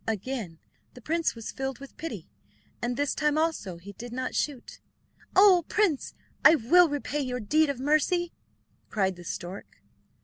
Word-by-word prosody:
Again 220 -5 -3 0.4
the 250 - -12
prince 330 +3 0
was 225 -1 -6
filled 265 -1 -4
with 275 +1 -12
pity, 325 +2 -6 0.5
and 245 0 -2
this 285 0 +1
time 300 0 +1
also 310 - -1
he 190 +4 -10
did 235 +4 -9
not 255 +1 -3
shoot. 280 -5 -3 0.6
"Oh, 375 -3 +7
prince, 400 -10 0 0.3
I 315 - +9
will 335 +7 +5
repay 290 0 -2
your 255 -3 -2
deed 305 +8 +2
of 275 -3 -3
mercy," 310 +5 +1 0.6
cried 190 -3 0
the 175 - -12
stork. 175 +2 -7
270 Hz, 160 wpm, -27 LUFS, 230-315 Hz, 0.6 s, I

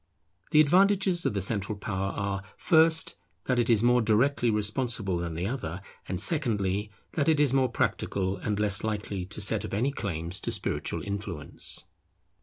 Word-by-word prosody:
The 155 - +6
advantages 185 +3 +3
of - - -2
the 100 - 0
central 100 +1 -1
power 95 -1 -3
are, 100 -1 -2 0.2
first, 160 -1 +3 0.3
that 130 -2 0
it 120 - +1
is 115 -2 +4
more 125 0 +4
directly 120 +4 +2
responsible 105 -3 0
than 85 -2 -4
the 85 +3 -2
other; 100 -7 -4 0.3
and, 95 - -2
secondly, 105 - +1 0.2
that 145 0 +1
it 155 -2 +3
is 145 -3 +3
more 130 -2 +3
practical 95 -4 -1
and 105 -1 -2
less 105 -2 0
likely 105 -3 -3
to 100 - -7
set 105 +1 +3
up - - -4
any 125 +7 +1
claims 85 - -4
to - - -3
spiritual - - -2
influence. 100 -6 -4
105 Hz, 170 wpm, -28 LUFS, 95-135 Hz, 0.3 s, The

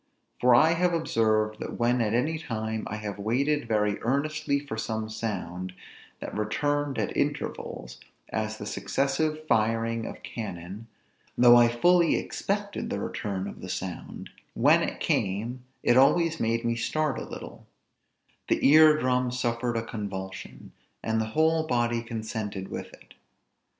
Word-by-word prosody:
For 125 -1 +5
I 155 +7 +6
have 175 +1 +2
observed, 110 -8 +1
that - - -5
when 120 +1 +2
at 110 0 +1
any 155 +6 0
time 110 -5 -3
I 105 - -3
have 105 -1 -5
waited 140 +6 0
very 105 -2 +1
earnestly 140 +3 0
for 140 -5 -6
some 110 0 -3
sound, 95 -5 -4 0.5
that - - -6
returned 145 +7 -1
at - - -2
intervals, 65 +1 -3 0.3
(as 110 0 -2
the 105 - -7
successive 140 +10 -1
firing 115 -1 +1
of - - -9
cannon,) 100 0 -7 0.5
though 120 -1 +8
I 120 0 +7
fully 170 +8 +4
expected 205 +3 -3
the 245 - -2
return 100 -2 -3
of - - -9
the 95 - -7
sound, 90 -1 -6 0.2
when - - +5
it - - -3
came 115 +7 -1 0.2
it 120 - +4
always 165 +5 +4
made 115 +1 0
me 115 0 +1
start 155 +5 -1
a - - -5
little; - - -9 0.8
the - - +3
ear 155 +1 +7
drum 125 -2 +1
suffered 120 -1 -1
a 115 - -1
convulsion, 95 -4 -7 0.3
and 110 0 0
the - - -1
whole 160 0 +3
body 120 -2 +1
consented 110 -4 -5
with - - -6
it. - - -17
115 Hz, 150 wpm, -27 LUFS, 110-140 Hz, 0.8 s, though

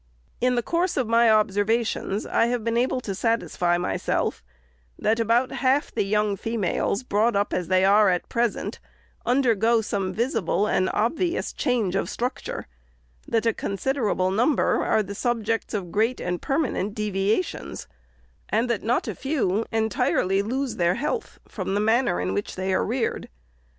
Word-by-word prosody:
" - - -36
In 250 - +2
the 240 - 0
course 345 +4 0
of 255 -4 +1
my 230 0 +4
observations, 215 0 +1
I 230 - +2
have 240 -2 -1
been 230 0 -1
able 255 +1 +1
to 200 - -4
satisfy 190 -5 0
myself, 175 - -1 0.5
that 220 +2 +1
about 230 +3 +2
half 270 +2 +1
the - - 0
young 210 0 +1
females, 220 +1 -1
brought 225 -1 +1
up 200 +1 0
as 180 -2 -1
they 185 +1 +3
are 205 +1 +5
at 180 -1 0
present, 235 -2 -1 0.5
undergo 235 -3 +3
some 200 -3 -2
visible 225 - 0
and 185 -3 +1
obvious 330 - -1
change 235 -9 0
of 195 - -1
structure; 250 +2 -4 0.6
that 225 0 0
a 230 - +3
considerable 205 -4 -1
number 240 +8 +2
are 215 - +2
the 200 0 -7
subjects 225 0 -1
of 180 -4 -4
great 225 +4 +1
and 180 -1 -3
permanent 270 - -1
devia 210 - +1
tions; - - -8 0.6
and 225 +3 +1
that 225 - -1
not 235 +3 0
a - - -2
few 230 -7 -1
entirely 215 -3 +1
lose 255 +4 -2
their 175 0 +2
health 370 - -3
from 195 - -3
the - - +2
manner 225 - +2
in 90 +1 -1
which 100 - -3
they 190 0 -1
are - - +2
reared. 240 +3 -2
220 Hz, 165 wpm, -24 LUFS, 195-240 Hz, 0.6 s, are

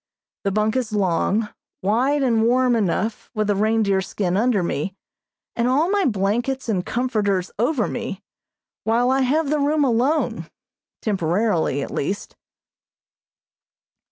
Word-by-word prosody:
The 195 - +2
bunk 215 +3 +1
is 240 -4 -1
long, 200 +2 +1 0.3
wide 260 +8 +2
and 230 -4 +2
warm 245 +2 +3
enough 215 +1 -1
with 215 -1 +1
a - - +1
reindeer 210 -2 +2
skin 185 -1 -2
under 215 -2 +2
me, 170 +3 -2 0.6
and 235 +1 +1
all 295 +8 +2
my 405 -2 +2
blankets 235 +5 0
and 195 -5 0
comforters 215 -5 -1
over 255 +6 +1
me, - - -5 0.6
while 240 +3 +2
I 270 +1 +2
have 285 +3 +1
the 305 - +2
room 295 +1 +2
alone, 265 +5 +1 0.5
temporarily, 175 -6 0
at - - -7
least. 195 +8 -3
225 Hz, 130 wpm, -22 LUFS, 200-255 Hz, 0.6 s, warm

